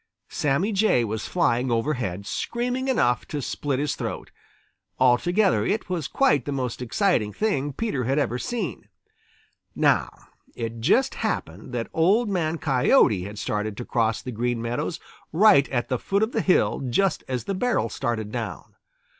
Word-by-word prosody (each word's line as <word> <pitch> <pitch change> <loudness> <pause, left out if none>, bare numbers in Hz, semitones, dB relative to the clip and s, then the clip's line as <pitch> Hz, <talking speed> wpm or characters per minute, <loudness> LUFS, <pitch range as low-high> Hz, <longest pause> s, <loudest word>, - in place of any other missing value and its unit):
Sammy 150 +9 0
Jay 200 - +3
was 110 -1 -3
flying 130 -8 +1
overhead, 115 -6 -1
screaming 250 - -2
enough 125 - +1
to 150 - -4
split 140 0 -2
his 145 +1 -1
throat. - - -5 0.7
Altogether, 175 - +3
it 210 -2 -2
was 165 -5 -2
quite 255 - +2
the 145 - -3
most 130 -3 -3
exciting 125 - +1
thing 145 - -1
Peter 140 - -2
had 135 +4 0
ever 125 -4 0
seen. 190 - -4 0.9
Now - - +3 0.5
it 115 -1 -5
just 195 - +3
happened 115 - -4
that 120 -2 -2
Old 205 +8 +3
Man 165 -4 0
Coyote 125 - +3
had 105 +1 -8
started 105 0 -3
to 120 - -5
cross 115 -2 0
the 125 - -5
Green 120 +1 -1
Meadows 120 +8 -3 0.3
right 160 -5 +5
at 120 -3 -1
the 125 -3 0
foot 200 +2 0
of 220 - 0
the 225 - 0
hill 185 - +2
just 185 +5 +1
as 125 -3 -2
the 195 - -3
barrel 240 - 0
started 110 -2 -3
down. - - -5
135 Hz, 160 wpm, -24 LUFS, 120-195 Hz, 0.9 s, right